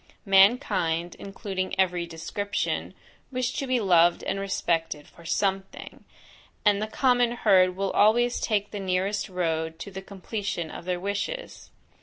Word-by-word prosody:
Mankind, 190 -5 +3
including 195 -1 -4
every 180 -2 +1
description, 195 +5 -3 0.4
wish 255 -1 -1
to 275 - -3
be 255 -1 +2
loved 175 -4 +4
and 195 - -2
respected 165 -6 -1
for 170 - -17
SOMETHING; 195 +2 -3 0.6
and 205 0 +4
the 215 - -1
common 245 +1 +2
herd 185 -6 +4
will 195 0 -1
always 240 +4 +3
take 205 -2 -1
the 205 - -5
nearest 195 +2 -1
road 160 -3 -2
to 200 - -8
the 190 0 -7
completion 195 -3 -5
of - - -9
their 180 -1 -1
wishes. 200 - -4
195 Hz, 140 wpm, -26 LUFS, 175-210 Hz, 0.6 s, loved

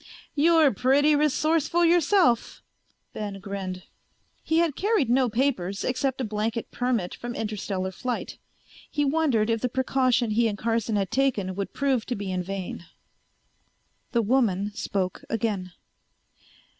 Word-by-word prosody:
"You're 315 -2 +4
pretty 280 +7 +3
resourceful 310 +3 +2
yourself," 340 - +3 0.5
Ben 205 -2 -5
grinned. 190 -2 -5 0.6
He 320 - 0
had 330 -4 +2
carried 395 - +1
no 255 0 +3
papers 215 -6 -1
except 260 +1 -1
a - - -1
blanket 220 +1 -3
permit 245 -7 -1
from 240 0 -6
Interstellar 200 -3 -3
Flight. 245 +5 -4 0.5
He 290 -1 0
wondered 275 -7 +2
if 225 -1 0
the 250 - 0
precaution 255 -2 +1
he 230 +2 +3
and 205 -2 -3
Carson 225 -1 -1
had 195 -2 -1
taken 240 -9 +1
would 195 +1 -5
prove 270 -5 0
to 245 - -2
be 200 -2 -4
in 185 0 -1
vain. 185 -2 -5 1.3
The 235 -1 +2
woman 210 -4 +1
spoke 185 -3 -3
again. 205 -5 -2
235 Hz, 135 wpm, -26 LUFS, 200-275 Hz, 1.3 s, You're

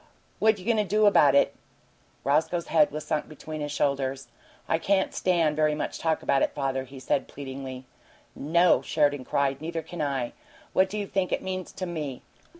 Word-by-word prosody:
"What 220 -1 +4
you 185 - -11
goin' 230 -1 +2
to 210 - +3
do 210 +2 +2
about 145 -9 +6
it?" 140 - +4 0.7
Roscoe's 160 +5 +1
head 200 - +5
was 155 0 -6
sunk 155 -1 -2
between 155 0 -7
his 145 0 -3
shoulders. 135 -2 -1 0.4
"I 160 - +1
can't 190 +2 +1
stand 170 -5 +2
very 155 0 +2
much 150 - -4
talk 160 -1 0
about 135 - +2
it, - - 0
father," 135 -1 -1
he 135 +1 -11
said, 135 +1 0
pleadingly. 130 -2 -7 0.5
"No!" 170 +4 +3
Sheridan 145 -4 +1
cried. 140 0 0
"Neither 165 0 -4
can 170 +1 -6
I! 135 -4 -1 0.4
What 190 0 +3
do 210 - -4
you 205 - -2
think 190 -2 -1
it - - -1
means 185 -1 -4
to 185 - -4
ME?" 150 -7 -5
155 Hz, 190 wpm, -27 LUFS, 140-180 Hz, 0.7 s, about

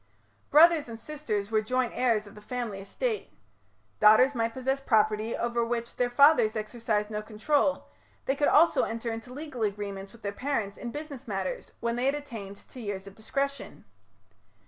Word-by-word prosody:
Brothers 315 -2 +6
and 225 -1 -7
sisters 225 -8 -3
were 215 -1 +3
joint 250 +3 0
heirs 230 -4 +1
of 205 - -13
the 210 - -13
family 230 -3 -4
estate. 430 - -3 0.7
Daughters 220 +6 +6
might 230 -2 0
possess 265 +1 -1
property 220 -3 +2
over 235 0 0
which 235 0 -3
their 245 -1 +1
fathers 245 -4 +5
exercised 215 -1 -2
no 210 0 -2
control: 275 +7 0 0.4
they 270 - +1
could 290 +1 +2
also 330 +3 +5
enter 230 +1 -2
into 225 +2 -8
legal 280 -2 -7
agreements 200 -2 -3
with 235 0 -17
their 200 - -2
parents 215 -3 -2
in 240 - -6
business 290 -1 -7
matters, 195 -3 -4
when 235 0 -1
they 245 - 0
had 275 - +2
attained 225 -9 -8
to 255 - -10
years 200 -3 -4
of 195 - -11
discretion. 275 +6 -4
230 Hz, 170 wpm, -28 LUFS, 210-275 Hz, 0.7 s, Brothers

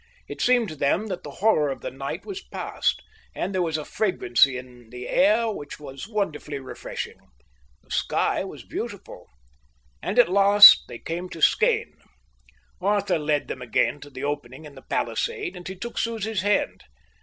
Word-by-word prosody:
It - - -7
seemed 245 -2 +3
to 155 - -7
them 145 +9 +1
that 185 - -4
the 145 - -9
horror 155 -2 +2
of 135 - -5
the - - -5
night 135 +1 -6
was 400 -1 -6
passed, - - -2 0.3
and 200 - -3
there 185 - 0
was 160 -3 0
a 155 - -6
fragrancy 140 - +2
in 125 -2 -12
the 125 +1 -8
air 265 -6 +3
which 145 -8 -8
was 135 +2 -9
wonderfully 195 -9 -3
refreshing. 130 -1 -7 0.6
The - - -22
sky - - 0
was - - -9
beautiful. - - -7 0.7
And - - -3
at - - +7
last 200 +2 +9
they 120 - -8
came 175 +7 -5
to 165 - -9
Skene. - - +2 0.8
Arthur 200 -2 +1
led 150 -1 0
them 130 - -6
again 120 +2 0
to 145 - -12
the 130 -1 -8
opening 145 0 -4
in 150 - -11
the 135 - -13
palisade, 425 - -2
and 175 - -9
he 190 - -6
took 235 +6 -5
Susie's 220 -3 -2
hand. 205 +1 0
165 Hz, 175 wpm, -24 LUFS, 140-205 Hz, 0.8 s, last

